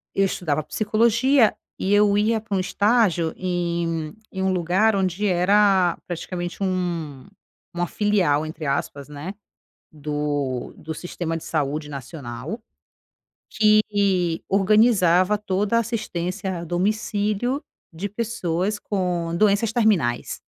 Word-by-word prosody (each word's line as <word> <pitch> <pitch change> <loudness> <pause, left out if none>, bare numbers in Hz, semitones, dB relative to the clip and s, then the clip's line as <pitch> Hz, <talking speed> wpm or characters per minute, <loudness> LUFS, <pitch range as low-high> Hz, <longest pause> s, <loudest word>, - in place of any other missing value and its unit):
eu 195 - +3
estudava 155 -5 -1
psicologia, 230 - +3 0.2
e 195 +2 +1
eu 205 0 +4
ia 220 +1 +2
pra 205 -3 -2
um - - +1
estágio 190 -4 +2
em 175 -2 -1 0.2
um - - -14 0.2
em 190 -1 -3
um 190 - +2
lugar 185 +5 +2
onde 190 +1 0
era 190 -1 +3
praticamente 175 +1 -5
um 170 -7 -3 0.5
uma 175 0 -1
filial, 190 -8 +1
entre 155 0 -7
aspas, 140 0 -2
né, 150 +6 -6 0.6
do 145 -3 -3
do 160 +1 -6
sistema 165 -1 -4
de 165 - -7
saúde 150 0 -2
nacional, 140 - -7 0.9
que 200 -5 +2
organizava 195 -2 +4
toda 205 +2 0
a - - +5
assistência 190 -4 -3
a - - -6
domicílio 210 - -1 0.3
de 195 +5 -4
pessoas 205 -3 -2
com 175 -4 -2
doenças 210 +2 +3
terminais. 210 - +1
185 Hz, 120 wpm, -23 LUFS, 165-210 Hz, 0.9 s, a